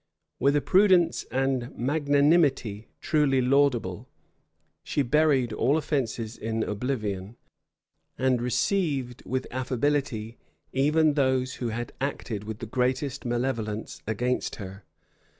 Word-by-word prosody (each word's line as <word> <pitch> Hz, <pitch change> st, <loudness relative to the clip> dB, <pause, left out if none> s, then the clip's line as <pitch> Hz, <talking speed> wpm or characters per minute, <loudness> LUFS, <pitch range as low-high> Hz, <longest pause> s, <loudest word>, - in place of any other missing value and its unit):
With 140 Hz, +1 st, +3 dB
a 145 Hz, -, +3 dB
prudence 185 Hz, -3 st, +4 dB
and 130 Hz, -2 st, -1 dB
magnanimity 140 Hz, -5 st, +2 dB
truly 145 Hz, -4 st, +2 dB
laudable, 125 Hz, -8 st, +1 dB, 0.7 s
she 145 Hz, -, 0 dB
buried 135 Hz, -3 st, +2 dB
all 130 Hz, +8 st, +2 dB
offences 120 Hz, -7 st, -2 dB
in 110 Hz, 0 st, -2 dB
oblivion, 105 Hz, -3 st, -3 dB, 0.8 s
and 130 Hz, -2 st, +2 dB
received 125 Hz, -, 0 dB
with 130 Hz, 0 st, -1 dB
affability 130 Hz, -3 st, -1 dB, 0.3 s
even 150 Hz, +3 st, +3 dB
those 130 Hz, -2 st, +1 dB
who 120 Hz, -, 0 dB
had 120 Hz, +1 st, -4 dB
acted 115 Hz, -6 st, -3 dB
with 110 Hz, 0 st, -5 dB
the 115 Hz, -, -6 dB
greatest 130 Hz, +4 st, -1 dB
malevolence 120 Hz, -3 st, -2 dB
against 125 Hz, +4 st, -1 dB
her. 95 Hz, -1 st, -9 dB
130 Hz, 110 wpm, -27 LUFS, 115-145 Hz, 0.8 s, prudence